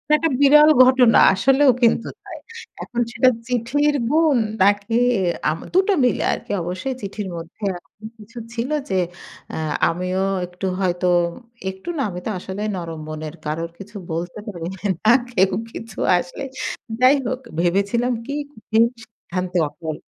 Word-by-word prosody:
একটা 325 +1 +1
বিরল 300 +2 +7 0.2
ঘটনা, 255 -3 +5 0.2
আসলেও 270 +7 +4
কিন্তু 230 -1 +3 0.2
তাই। - - -9 0.5
এখন 240 0 -3
সেটা 255 +2 +4 0.2
চিঠির 285 +5 +1
গুন, 310 -3 +3 0.2
নাকি 205 +3 +3 0.5
আম 160 +2 -2
দুটো 380 +2 +3
মিলে 245 -5 +2
আরকি। - - -7
অবশ্যই 185 +10 -4
চিঠির 200 0 -5
মধ্যে 165 +4 -9
এরকম 190 +3 -9
কিছু 225 +3 -15 0.2
ছিল 235 +2 -3 0.2
যে, 190 - 0 0.6
অ্যা - - -5 0.3
আমিও 185 +2 -1 0.2
একটু 180 +2 -7
হয়তো, 180 -1 0 0.6
একটু 190 - -8
না, 275 - 0
আমি 180 - -6
তো - - -2
আসলে 190 +2 -6
নরম 165 -3 -6
মনের। 155 -1 -6
কারোর 165 +2 -3
কিছু 205 +2 -12 0.2
বলতে 170 +4 -4
পারি 175 -5 -6 0.4
না। 220 - +4 0.2
কেউ 190 -3 +3 0.2
কিছু 225 -3 -9 0.2
আসলে 175 +9 -5 0.6
যাই 255 +3 +6
হোক, 255 0 -2 0.2
ভেবেছিলাম 200 +8 +1
কি? 280 - -5 0.3
আমি 220 +1 0 0.2
সিদ্ধান্তে 185 -4 -5
অটল। 155 +1 -6
205 Hz, 145 wpm, -21 LUFS, 180-250 Hz, 0.6 s, বিরল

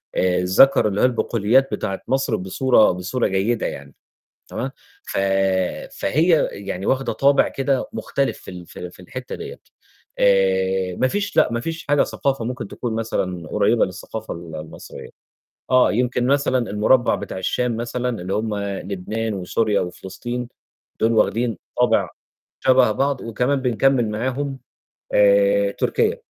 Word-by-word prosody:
آآ 90 -1 +2
ذكر 100 +8 +5
اللي 100 -1 -1
هو - - +6
البقوليات 120 +1 +2
بتاعة 95 0 -3
مصر 130 -3 +1
بصورة 110 +5 +3
بصورة 90 +8 -1
جيدة 100 +5 0
يعني، 70 0 -6 0.5
تمام. - - -4 0.3
ف - - -5 0.8
فهي 160 - +2
يعني 95 -1 -6
واخده 135 0 0
طابع 140 0 +4
كده 135 -1 -1
مختلف 140 -1 -2
في - - -10
ال 90 -1 -9
في - - -12
ال 90 0 -7
في - - -18
الحتّة 90 - -7
دِيّة، - - -8 0.6
آآ، 95 -1 +2
ما 130 - +2
فيش 200 +7 -3
لأ، - - +4
ما 120 - -1
فيش 165 +5 -5
حاجة 145 0 +4
ثقافة 135 -4 -2
ممكن 125 -3 -4
تكون 115 +1 -4
مثلًا 90 -7 -3
قريّبة - - +2
للثقافة - - -7
ال 85 -1 -9
المصرية. 80 0 -9 0.6
آه 130 0 +5
يمكن 125 +1 0
مثلًا 130 -3 +1
المربّع 115 +5 +3
بتاع - - -5
الشام 120 +5 -1
مثلًا 120 -2 -3
اللي 95 +2 -3
هم 105 0 -1
لبنان 100 +2 -3
وسوريا 100 +3 0
وفلسطين 120 +7 -5 0.5
دُول 115 +1 +3
واخدين 115 -1 +1 0.2
طابع - - +3 0.5
شبه 130 -3 +4
بعض، 135 +3 0
وكمان 125 +5 -1
بنكمّل 125 -1 +2
معاهم 130 +5 -3 0.6
آآ، - - +4
تركيا. 460 +1 0
115 Hz, 145 wpm, -21 LUFS, 95-130 Hz, 0.8 s, هو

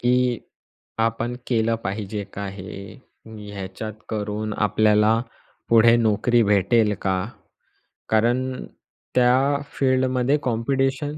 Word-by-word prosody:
की 125 -1 +2 0.6
आपण 115 +2 -1
केलं 115 -2 +1
पाहिजे 100 +1 -4
का 100 0 -5
हे? 100 0 -9 0.3
ह्याच्यात 105 -1 -7 0.2
करून 105 0 -3
आपल्याला 110 +1 +3 0.5
पुढे 115 0 +6
नोकरी 115 +1 +2
भेटेल 105 +1 +3
का? 95 -1 +1 0.9
कारण 125 +4 +1 0.5
त्या 130 +3 +4 0.2
फील्डमध्ये 130 0 +2
कॉम्पिटिशन 135 +4 -1
115 Hz, 90 wpm, -23 LUFS, 105-125 Hz, 0.9 s, पुढे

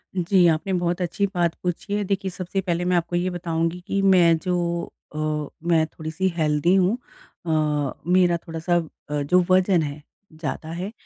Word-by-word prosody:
जी, 180 0 +3
आपने 165 +4 +1
बहुत 175 0 0
अच्छी 200 +4 0
बात 170 -1 +1
पूछी 180 +3 -3
है 205 0 0
देखिए, 195 -1 -2
सबसे 185 +2 -3
पहले 175 -1 -1
मैं 180 0 +2
आपको 175 +1 -1
ये 180 +1 +1
बताऊँगी 170 0 -2
कि 195 0 0
मैं 175 -4 +5
जो 180 -1 0 0.6
अ, - - -4 0.5
मैं 160 -2 +4
थोड़ी-सी 160 +4 -3
हेल्दी 155 +2 +2
हूँ 195 +5 +3 0.5
अ, 150 -3 +1 0.2
मेरा 180 -2 +4
थोड़ा-सा 165 +1 -2 0.3
अ, 150 0 -1
जो 180 +5 +3
वजन 185 -2 +4
है 145 0 -4 0.4
ज़्यादा 160 +1 -4
है, 180 +5 -4
175 Hz, 170 wpm, -23 LUFS, 160-185 Hz, 0.6 s, मैं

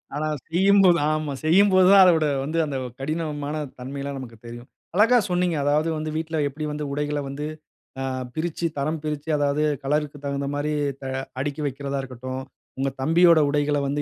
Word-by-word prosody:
ஆனா 155 +1 -1 0.2
செய்யும் 195 +4 +4
போது 175 -3 +5
ஆமா, 155 -2 -1
செய்யும்போது 185 +2 +5
தான் 195 - +9
அதோட 165 -3 +4 0.2
வந்து 155 +4 -3
அந்த 140 -3 -3 0.2
கடினமான 150 0 -3 0.2
தன்மைலாம் 140 +2 -5
நமக்கு 115 -3 -9
தெரியும். 120 +1 -10 0.3
அழகா 230 +5 +5
சொன்னீங்க. 180 -2 +1
அதாவது 150 +3 +2
வந்து 155 0 -3
வீட்ல 160 0 -2
எப்டி 150 +2 -5
வந்து 150 0 -4
உடைகளை 145 0 -1
வந்து 145 +2 -5 0.6
அ - - -1 0.3
பிரிச்சு 170 +1 -2
தரம் 155 +3 -1
பிரிச்சு 150 0 -4
அதாவது 145 +1 +1 0.2
கலர்‌க்கு 150 +1 -1
தகுந்த 140 0 -2
மாரி 145 +1 -1 0.3
தா 135 - -5 0.3
அடுக்கி 145 +2 -3
வைக்கிறதா 140 0 -3
இருக்கட்டும். 130 0 -6 0.4
உங்க 135 +1 0
தம்பியோட 170 +3 +5
உடைகளை 145 0 +1
வந்து 145 +1 -1
150 Hz, 165 wpm, -24 LUFS, 140-160 Hz, 0.6 s, தான்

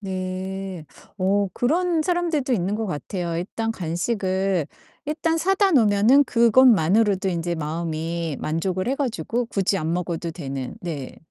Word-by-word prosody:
네. 190 -2 -5 0.3
어 195 +1 +2
그런 330 +5 +1
사람들도 335 -6 0
있는 195 -3 0
것 220 +1 -2
같아요. 170 0 -3
일단 225 +5 -3
간식을 190 -1 -1 0.4
일단 325 +2 0
사다 385 +3 +2
놓으면은 230 - +5
그것만으로도 220 - +4
인제 175 -1 -1
마음이 165 0 -3
만족을 185 +6 -1
해 265 - +1
가지고 240 - -2
굳이 195 -2 0
안 160 +1 -2
먹어도 170 -1 -2
되는. 135 -6 -5
네. 150 -7 -6
190 Hz, 285 characters per minute, -23 LUFS, 170-235 Hz, 0.4 s, 놓으면은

